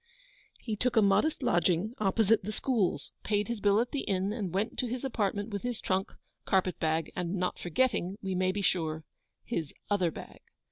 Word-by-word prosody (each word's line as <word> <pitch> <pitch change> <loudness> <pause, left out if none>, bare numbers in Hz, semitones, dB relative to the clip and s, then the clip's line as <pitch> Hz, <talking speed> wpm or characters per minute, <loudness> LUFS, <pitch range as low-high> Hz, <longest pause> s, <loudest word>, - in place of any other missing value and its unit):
He 220 -3 -3
took 245 +4 0
a - - +8
modest 260 +10 +3
lodging 180 0 +2
opposite 215 +2 +3
the 210 - -3
Schools, 220 -4 0
paid 210 -1 0
his 235 -2 -3
bill 205 0 +4
at 240 +1 0
the 285 - -1
inn, 195 -3 0
and 205 -6 -3
went 195 +4 -1
to 250 - +1
his 250 +3 -3
apartment 205 -3 -1
with 200 -1 -3
his 245 -2 -2
trunk, 190 +1 -1 0.3
carpet 185 -2 +1
bag, 160 0 0
and 180 +1 -2
not 180 -1 -1
forgetting, 190 0 0
we 190 -2 -3
may 185 0 +2
be 200 +1 -3
sure, 160 -4 0 0.4
his 165 -11 -3 0.2
OTHER 185 -4 +3
bag. - - -10
200 Hz, 190 wpm, -30 LUFS, 180-225 Hz, 0.4 s, a